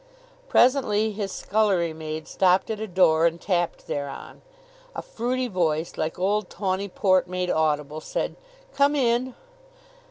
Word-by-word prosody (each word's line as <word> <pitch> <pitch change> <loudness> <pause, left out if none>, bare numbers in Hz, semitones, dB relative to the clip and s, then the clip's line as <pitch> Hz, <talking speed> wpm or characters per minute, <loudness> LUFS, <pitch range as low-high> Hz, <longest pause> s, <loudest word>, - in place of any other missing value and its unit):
Presently 220 -5 +3
his 200 -2 -4
scullery 190 -7 +1
maid 155 0 -6
stopped 185 +2 +2
at 215 - -4
a 220 - -4
door 170 -3 +4
and 170 0 -3
tapped 175 -3 -1
thereon. 140 -1 -6 0.5
A - - -3
fruity 250 +2 -2
voice, 165 -5 -1
like 155 - -3
old 200 +1 0
tawny 195 0 -2
port 185 -1 +2
made 180 0 -2
audible, 150 -1 0
said: - - -3 0.4
"Come 280 +1 +3
in!" 250 -1 +1
185 Hz, 135 wpm, -25 LUFS, 160-220 Hz, 0.5 s, door